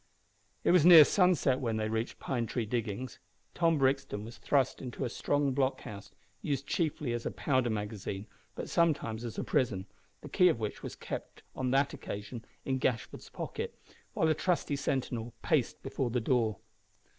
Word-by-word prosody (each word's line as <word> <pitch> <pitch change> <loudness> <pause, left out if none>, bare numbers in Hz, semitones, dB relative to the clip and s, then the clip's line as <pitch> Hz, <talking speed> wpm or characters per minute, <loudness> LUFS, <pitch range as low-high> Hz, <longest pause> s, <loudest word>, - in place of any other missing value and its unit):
It - - +4
was 180 -4 +6
near 165 -3 +11
sunset 180 -9 +3
when 115 -4 -1
they 110 0 -1
reached 110 +2 -2
Pine 120 -4 -2
Tree 115 0 -2
Diggings. 115 +1 -3 0.3
Tom 165 -2 +2
Brixton 135 -6 0
was 115 +1 -10
thrust 135 -3 +1
into 125 0 -4
a - - -2
strong 145 +3 0
blockhouse, 130 -6 -2 0.3
used 140 -2 -2
chiefly 150 -6 -1
as 120 - -3
a - - -1
powder 130 -4 0
magazine, 105 -2 -4 0.3
but - - -5
sometimes 140 -9 +1
as 115 -2 -6
a - - -1
prison, 100 -8 0 0.4
the - - -9
key 180 -2 +5
of 140 - 0
which 105 -2 -4
was - - -6
kept - - -7
on 130 -1 -1
that 135 +2 +2
occasion 105 +3 -6 0.2
in 130 -1 0
Gashford's 120 -3 -2
pocket, - - -5 0.4
while 160 - +2
a 160 - +4
trusty 165 -2 0
sentinel 125 -4 -2
paced - - +1
before 130 - -2
the 125 +1 0
door. 115 -3 +1
125 Hz, 170 wpm, -31 LUFS, 110-140 Hz, 0.4 s, near